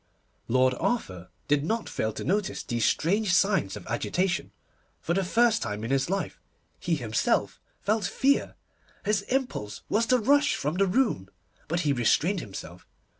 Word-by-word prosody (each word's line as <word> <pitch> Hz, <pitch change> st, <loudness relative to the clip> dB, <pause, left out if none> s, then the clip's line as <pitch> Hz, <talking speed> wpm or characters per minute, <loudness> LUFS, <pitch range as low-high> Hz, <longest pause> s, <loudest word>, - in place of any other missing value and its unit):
Lord 130 Hz, +1 st, +3 dB
Arthur 95 Hz, -, -2 dB, 0.2 s
did 145 Hz, -1 st, +2 dB
not 225 Hz, +8 st, -1 dB
fail 110 Hz, -, -2 dB
to -, -, -5 dB
notice 200 Hz, +1 st, -1 dB
these 120 Hz, -2 st, -1 dB
strange 190 Hz, -, +2 dB
signs 190 Hz, -, +2 dB
of 100 Hz, -, -11 dB
agitation, 180 Hz, 0 st, -1 dB
and, -, -, -28 dB, 0.5 s
for 170 Hz, -, -1 dB
the 195 Hz, +2 st, +1 dB
first 230 Hz, +4 st, +3 dB
time 105 Hz, +1 st, -3 dB
in 115 Hz, -, -3 dB
his 135 Hz, +2 st, +1 dB
life, 195 Hz, +1 st, -3 dB, 0.4 s
he -, -, 0 dB
himself -, -, 0 dB, 0.2 s
felt 215 Hz, -1 st, 0 dB
fear. 275 Hz, +8 st, +1 dB, 0.5 s
His 210 Hz, -1 st, +2 dB
impulse 250 Hz, -, -2 dB
was 225 Hz, +2 st, +2 dB
to 255 Hz, -, +4 dB
rush 285 Hz, +6 st, +3 dB
from 150 Hz, +5 st, -2 dB
the 195 Hz, 0 st, +3 dB
room, 185 Hz, -, +1 dB, 0.4 s
but 170 Hz, +2 st, 0 dB
he 145 Hz, -4 st, +2 dB
restrained 155 Hz, -, +2 dB
himself. 90 Hz, -, -9 dB
180 Hz, 165 wpm, -27 LUFS, -, 0.5 s, to